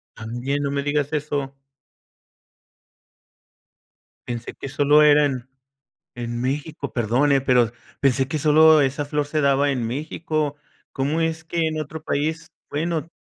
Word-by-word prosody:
¿También?, 120 Hz, +5 st, -3 dB
no 140 Hz, -, -1 dB
me 140 Hz, 0 st, -1 dB
digas 145 Hz, 0 st, 0 dB
eso. 145 Hz, -2 st, -2 dB, 2.7 s
Pensé 120 Hz, -1 st, -5 dB
que -, -, -8 dB
solo 145 Hz, +2 st, +4 dB
era 150 Hz, 0 st, +6 dB
en 130 Hz, -3 st, -3 dB, 0.7 s
en 120 Hz, -1 st, -4 dB
México, 140 Hz, +2 st, -3 dB
perdón 120 Hz, +5 st, +2 dB
eh,, 135 Hz, -, +4 dB
pero 125 Hz, -4 st, +3 dB, 0.3 s
pensé 135 Hz, -1 st, +2 dB
que 155 Hz, -, -2 dB
solo 155 Hz, +1 st, +6 dB
esa 140 Hz, +2 st, -1 dB
flor 150 Hz, 0 st, -1 dB
se 150 Hz, +1 st, -1 dB
daba 140 Hz, 0 st, +3 dB
en 125 Hz, -4 st, -1 dB
México, 150 Hz, +3 st, -2 dB, 0.4 s
¿cómo 145 Hz, +5 st, 0 dB
es 160 Hz, 0 st, -1 dB
que 165 Hz, 0 st, -1 dB
en 155 Hz, 0 st, -2 dB
otro 155 Hz, +1 st, -7 dB
país?, 160 Hz, +2 st, -2 dB, 0.2 s
bueno 160 Hz, +1 st, -2 dB
145 Hz, 140 wpm, -23 LUFS, 135-155 Hz, 2.7 s, era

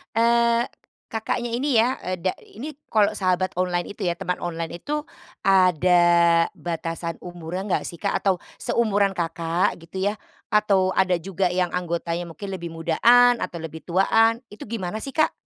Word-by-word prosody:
Eee, 235 Hz, 0 st, +3 dB, 0.5 s
Kakaknya 230 Hz, +2 st, -2 dB
ini 260 Hz, +1 st, +1 dB
ya, 235 Hz, +4 st, +4 dB
e 185 Hz, 0 st, -3 dB
da 185 Hz, +2 st, -1 dB
ini 290 Hz, +8 st, -8 dB, 0.2 s
kalau 210 Hz, -1 st, +3 dB
sahabat 185 Hz, -2 st, 0 dB
online 175 Hz, -1 st, -1 dB
itu 205 Hz, -, -13 dB
ya, 175 Hz, -2 st, 0 dB
teman 180 Hz, -1 st, -3 dB
online 170 Hz, 0 st, -4 dB
itu, 300 Hz, +1 st, -3 dB, 0.4 s
ada 185 Hz, -2 st, +4 dB, 0.6 s
batasan 165 Hz, 0 st, -4 dB
umurnya 175 Hz, 0 st, -6 dB
enggak -, -, +1 dB
sih 170 Hz, -, -8 dB
Kak 200 Hz, -, +1 dB
atau, 190 Hz, -3 st, 0 dB, 0.2 s
seumuran 210 Hz, -5 st, +1 dB
Kakak 165 Hz, 0 st, -1 dB
gitu 190 Hz, +4 st, -3 dB
ya, 210 Hz, -, -5 dB, 0.3 s
atau 200 Hz, -3 st, +3 dB
ada 185 Hz, -1 st, +3 dB
juga 185 Hz, 0 st, -1 dB
yang 180 Hz, -1 st, +1 dB
anggotanya 170 Hz, -1 st, -2 dB
mungkin 195 Hz, +6 st, -7 dB
lebih 170 Hz, -3 st, -6 dB
mudaan 240 Hz, +10 st, +5 dB
atau 170 Hz, -6 st, -5 dB
lebih 160 Hz, 0 st, -8 dB
tuaan, 225 Hz, +6 st, +3 dB
itu 210 Hz, -, -10 dB
gimana 215 Hz, -3 st, -4 dB
sih 270 Hz, +5 st, -6 dB
Kak? 310 Hz, +2 st, +2 dB
185 Hz, 160 wpm, -24 LUFS, 175-220 Hz, 0.6 s, mudaan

